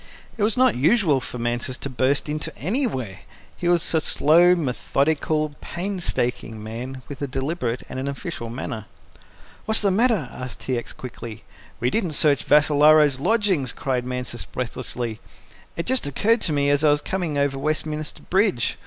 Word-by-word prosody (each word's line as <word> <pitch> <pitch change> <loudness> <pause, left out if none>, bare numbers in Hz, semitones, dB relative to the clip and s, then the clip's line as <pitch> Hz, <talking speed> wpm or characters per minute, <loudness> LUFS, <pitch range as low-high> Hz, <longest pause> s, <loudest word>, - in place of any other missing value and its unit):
It 225 - -6
was 210 +2 +2
not 255 +1 +5
usual 155 - +3
for 125 - -6
Mansus 120 +2 -2
to - - -5
burst 130 +2 0
into 150 +1 -3
anywhere. 145 - -2 0.4
He 175 - -3
was 175 -1 +3
a 160 - +3
slow, 170 +4 +5
methodical, 155 +1 0
painstaking 170 - -3
man, 125 +4 -6
with 145 -1 -8
a 140 - -1
deliberate 130 -2 -2
and 130 - -6
an 135 - -3
official, 130 -4 -5
manner. 115 -3 -5 0.8
"What's 220 0 +4
the 200 -2 +2
matter?" 215 - +2
asked 125 -1 -8
T. 130 - -1
X. 120 - -4
quickly. 120 -3 -9 0.4
"We 125 +1 +1
didn't 180 -5 0
search 145 -1 +3
Vassalaro's 150 -1 +5
lodgings," 185 - +1
cried 130 -2 -1
Mansus 125 -1 -4
breathlessly. 120 -2 -5 0.6
"It 170 - -2
just 260 - +1
occurred 215 - +2
to 165 - +1
me 145 -1 +2
as 145 +1 +2
I 155 - +6
was 145 0 +3
coming 175 -6 -2
over 140 -1 0
Westminster 155 +1 -3
Bridge. 190 - +1
145 Hz, 160 wpm, -23 LUFS, 125-175 Hz, 0.8 s, I